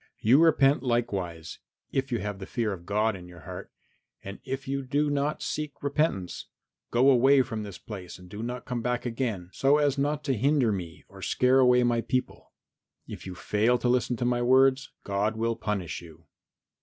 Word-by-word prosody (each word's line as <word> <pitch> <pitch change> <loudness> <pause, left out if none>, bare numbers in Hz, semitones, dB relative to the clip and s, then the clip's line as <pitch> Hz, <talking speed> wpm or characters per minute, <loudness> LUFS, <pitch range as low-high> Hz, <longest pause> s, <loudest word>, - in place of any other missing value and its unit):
You 130 +8 +4
repent 140 -4 +4
likewise, 100 -10 -2 0.3
if 135 0 -1
you 120 - +1
have 105 -1 -4
the 95 - -7
fear 115 -4 -1
of 85 -2 -10
God 105 +1 +1
in 90 -2 -10
your 90 -1 -13
heart, - - -9 0.5
and 100 +1 -8
if 135 0 -5
you 140 0 -1
do 145 +3 0
not 145 +1 -1
seek 150 -1 -3
repentance, 140 - -1 0.4
go 130 +4 +4
away 135 +2 +5
from 110 -2 -5
this 100 -3 -7
place 95 -5 -9
and 90 0 -14
do 105 +4 -8
not 125 +2 -5
come 125 -2 -3
back 125 +1 -2
again, 115 -7 -3
so 140 +2 +3
as 145 -2 +1
not 145 +1 0
to 140 - 0
hinder 135 0 +2
me 90 -5 -6
or - - -14
scare 130 +1 +3
away 125 -1 +5
my 120 -1 +2
people. 130 +1 -3 0.5
If - - -9
you 90 - -6
fail 110 +6 +1
to 125 - -2
listen 125 0 +1
to 120 - -2
my 120 0 +1
words 130 +2 +4
God 100 +2 -1
will 115 +1 0
punish 100 -8 -3
you." 80 -3 -15
120 Hz, 195 wpm, -27 LUFS, 100-135 Hz, 0.5 s, away